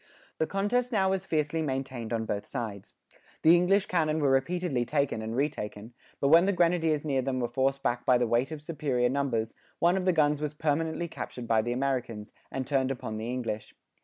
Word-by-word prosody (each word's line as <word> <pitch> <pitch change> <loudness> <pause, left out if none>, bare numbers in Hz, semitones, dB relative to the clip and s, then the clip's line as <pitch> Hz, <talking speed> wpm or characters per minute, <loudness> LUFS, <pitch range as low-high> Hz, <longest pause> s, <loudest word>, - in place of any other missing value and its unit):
The 160 - +1
contest 235 +6 0
now 190 -4 +2
was 190 0 -2
fiercely 155 0 0
maintained 130 -5 -3
on 115 -1 -1
both 100 -2 -3
sides. 110 -7 -6 0.5
The 165 +2 +8
English 190 +3 +3
cannon 160 -3 +1
were 140 -3 +2
repeatedly 135 0 +1
taken 140 -3 0
and 110 +1 -4
retaken; 120 -5 -3 0.3
but 140 - +2
when 170 +4 +7
the 200 - +3
grenadiers 165 -3 +2
near 135 -3 +1
them 130 0 -2
were 120 - 0
forced 135 +2 0
back 120 -2 0
by 125 - +4
the 120 - +1
weight 120 +5 +1
of 150 -2 -7
superior 140 -6 0
numbers, 125 -5 -1 0.2
one 175 +2 +3
of 185 - -2
the 185 - +4
guns 150 -3 +2
was 150 0 -3
permanently 160 +2 -1
captured 125 -6 -7
by 115 -1 +3
the 120 +2 -3
Americans, 125 -5 -2 0.2
and 130 -1 -3
turned 135 0 +1
upon 120 -4 -4
the 110 +2 -4
English. 120 -4 -4
140 Hz, 200 wpm, -28 LUFS, 120-160 Hz, 0.5 s, The